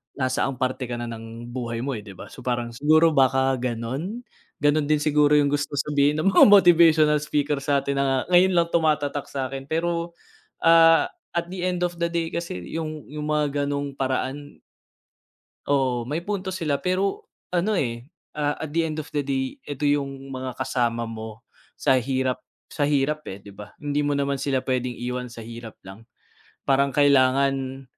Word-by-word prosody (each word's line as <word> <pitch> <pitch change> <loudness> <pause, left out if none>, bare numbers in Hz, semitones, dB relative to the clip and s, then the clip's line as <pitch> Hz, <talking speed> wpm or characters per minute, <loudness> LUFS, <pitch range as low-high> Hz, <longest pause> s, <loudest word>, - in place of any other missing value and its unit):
nasaang 130 0 -1
parte 130 0 -2
ka 120 - -4
na 120 - -4
ng 115 +1 -8
buhay 120 -2 -4
mo, 140 - -2
eh, 105 - -7
'di 100 -2 -11
ba, - - -11
so, - - -12
parang 120 -1 -2
siguro 155 +6 +4
baka 135 -2 +3
gan'on? 130 - -4 0.4
Gano'n 145 0 +3
din 150 0 +2
siguro 150 0 +3
yung 145 -1 +2
gusto 145 0 -1
sabihin 145 0 +1
ng 195 +5 +2
mga - - +8
motivational 165 -6 +6
speaker 145 -1 0
satin 140 -1 0
na 135 -1 +1
ngayon 180 +1 +6
lang 170 -1 +3
tumatatak 150 -3 +1
sakin 135 0 -4
pero, 170 +1 -1 0.5
ah, 165 0 +6 0.2
at 170 0 -1
the 185 -1 -5
end 180 -1 0
of 175 0 -4
the 170 - +1
day 170 -1 -1
kasi 170 - -4 0.2
yung, 155 -2 -4
yung 150 +1 -6
mga 145 -1 0
ganung 140 0 -3
paraan 135 +2 -3 1.1
Oo, 130 -4 +1
may 155 +5 -3
punto 190 -1 -3
sila 150 -6 -1
pero 185 +2 -1 0.2
ano, 180 +4 +1
eh, 120 -7 -2 0.3
ah, 145 -1 0
at 160 - -6
the 165 +2 +1
end 155 -1 -4
of - - -15
the 150 - -1
day 135 -1 -2
eto 145 0 -5
yung 140 -2 -1
mga 130 -1 -5
kasama 120 -3 -1
mo 110 -1 -8 0.3
sa 130 - +2
hirap, 130 0 -1 0.3
sa 145 - -1
hirap, 150 +1 0
eh, 95 - -6
'di 100 - -11
ba. 105 +1 -10
Hindi 145 0 -1
mo 145 - +1
naman 140 0 0
sila 135 -2 0
p'wedeng 125 -1 -1
iwan 125 +1 -4
sa 115 - -9
hirap 115 0 -9
lang, 95 +4 -12 0.7
parang 140 0 +3
kailangan, 135 -1 +2
140 Hz, 175 wpm, -24 LUFS, 130-155 Hz, 1.1 s, mga